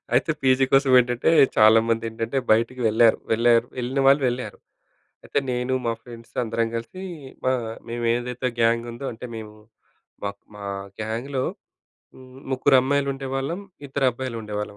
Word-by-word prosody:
అయితే, - - +2
పీజీ 130 0 +4
కోసం 135 -1 +5
ఏంటంటే, 125 +5 +1 0.3
చాలామందేంటంటే, 115 +2 +3
బయటికి 115 +3 +2
వెళ్లారు. 110 +1 +4
వెళ్ళేరు. 115 +1 +4
వెళ్ళినవాళ్ళు 135 +3 +3
వెళ్ళేరు. 125 +1 -4 0.7
అయితే - - 0
నేను, 125 +1 -1
మా 115 - +1
ఫ్రెండ్స్ 115 -1 -12
అందరం 115 0 -1
కలిసి, 150 +11 -6 0.5
ఆహ్, 115 -3 -2 0.2
మేవేదైతే 120 +2 -1
గ్యాంగుందో, 115 +2 0
అంటే 115 +2 -8
మేవు, 110 -1 -8 0.7
మాక్ 100 0 -5 0.2
మా 100 - -8 0.4
గ్యాంగ్‌లో 125 +5 -3 0.7
హ్మ్. 130 - -14 0.3
ముగ్గురమ్మాయిలుండేవాళ్ళం. 135 +4 +1 0.3
ఇద్దరబ్బాయిలుండేవాళ్ళం 115 -6 -2
120 Hz, 110 wpm, -24 LUFS, 115-130 Hz, 0.7 s, కోసం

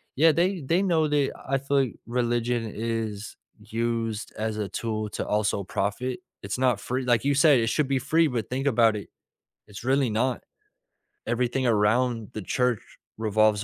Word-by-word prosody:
yeah, 160 +4 +6
they 180 +3 +1
they 165 +7 +1
know 165 -5 +2
they 145 -2 +2 0.2
I 135 - +3
feel 140 +1 -1
like 130 - -3
religion 120 -2 0
is 115 -2 -3 0.2
used 115 0 -3
as 110 0 -2
a 105 -2 -3
tool 110 -2 -3
to - - -4
also 105 -1 0
profit. 120 - -2 0.2
It's - - -3
not 125 -5 +2
free, 130 +4 -2
like 120 0 +2
you 140 -1 +2
said, 145 -3 +6
it 115 - 0
should 150 +2 +1
be 135 -1 +2
free, 160 +5 +3
but 115 -5 -3
think 135 +3 -2
about 115 -4 +4
it, 105 - -7 0.6
it's 105 0 -10
really 130 0 +2
not. 120 +3 0 0.8
Everything 125 +2 0
around 115 +1 +2
the 110 - -4
church 125 +5 0 0.4
revolves 110 -1 +2
120 Hz, 170 wpm, -26 LUFS, 110-135 Hz, 0.8 s, yeah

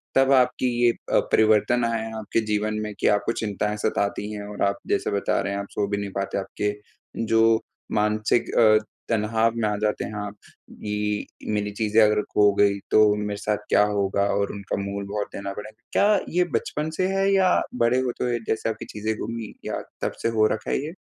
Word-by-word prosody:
तब 135 0 +4
आपकी 125 0 +3 0.2
ये 120 - +6
अ, - - 0
परिवर्तन 110 +3 +4
आया 115 -1 -1
है 110 - -8
आपके 110 +1 -1
जीवन 105 +1 0
में 105 -1 -5
कि - - +2
आपको 105 +3 -2
चिंताएँ 105 0 -1
सताती 105 0 -1
है। 105 -1 -6
और 105 - -8
आप 100 0 -2
जैसे - - 0
बता 100 - 0
रहे 100 - -2
हैं 100 - -2
आप 100 - -5
सो 100 -1 -1
भी 100 - -1
नहीं 100 -1 -4
पाते 100 0 -2
आपके 105 +1 -2 0.5
जो 115 0 +4 0.3
मानसिक 105 +2 +1
अ, 110 -2 +7 0.3
तनाव 110 +1 +2
में 115 -2 0
आ 105 - -1
जाते 105 -1 0
हैं 110 - -7
आप 100 - -7 0.4
कि 105 0 -3 0.3
मेरी 105 0 -1
चीज़ें 110 0 +3
अगर 105 0 +3
खो 105 -1 +5
गई 100 -1 +3
तो - - +6 0.2
मेरे 105 -1 -3
साथ 105 0 -1
क्या 105 - +5
होगा 100 -1 0
और 100 0 0
उनका 100 -1 -4
मूल 100 0 -4
बहुत 105 0 -3
देना 100 0 -5
पड़ेगा? 110 +2 -10
क्या 205 -1 +4 0.2
ये 180 - +5
बचपन 150 +1 -2
से 185 - +2
है 195 0 +2
या 190 -1 +4 0.3
बड़े 120 +2 +3
होते 125 -2 -2
हुए 120 -1 0
जैसे 110 0 0
आपकी 110 - -5
चीज़ें 110 +1 -3
गुमी 115 -2 -5
या - - -3 0.2
तब - - 0
से - - +2
हो 110 0 +5
रखा 110 0 -3
है - - +2
ये? 155 - -5
105 Hz, 210 wpm, -24 LUFS, 105-115 Hz, 0.5 s, अ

